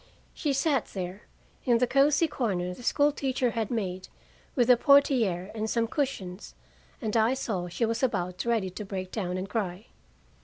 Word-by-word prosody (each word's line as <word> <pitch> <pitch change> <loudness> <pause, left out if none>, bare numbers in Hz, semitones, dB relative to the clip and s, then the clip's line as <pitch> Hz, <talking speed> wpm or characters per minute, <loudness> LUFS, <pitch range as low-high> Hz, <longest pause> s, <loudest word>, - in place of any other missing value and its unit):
She 295 - -1
sat 275 -2 +1
there, 185 +1 -5 0.4
in 240 -3 +4
the 250 - +3
cozy 280 +5 +3
corner 185 - -2
the 215 - -11
school 290 +4 +3
teacher 260 -3 0
had 225 -3 -2
made 190 -6 -3 0.5
with 245 -4 +3
a - - +8
portière 235 - +3
and 220 0 -3
some 230 0 +1
cushions, 220 - -3 0.4
and 220 -1 -3
I 225 +3 +3
saw 195 -9 -3
she 175 +7 -1
was 225 0 -1
about 180 -8 -1
ready 225 -6 0
to 210 - -6
break 190 -2 -5
down 185 -4 -2
and 185 +1 -4
cry. 200 -2 -3
225 Hz, 175 wpm, -28 LUFS, 185-260 Hz, 0.5 s, a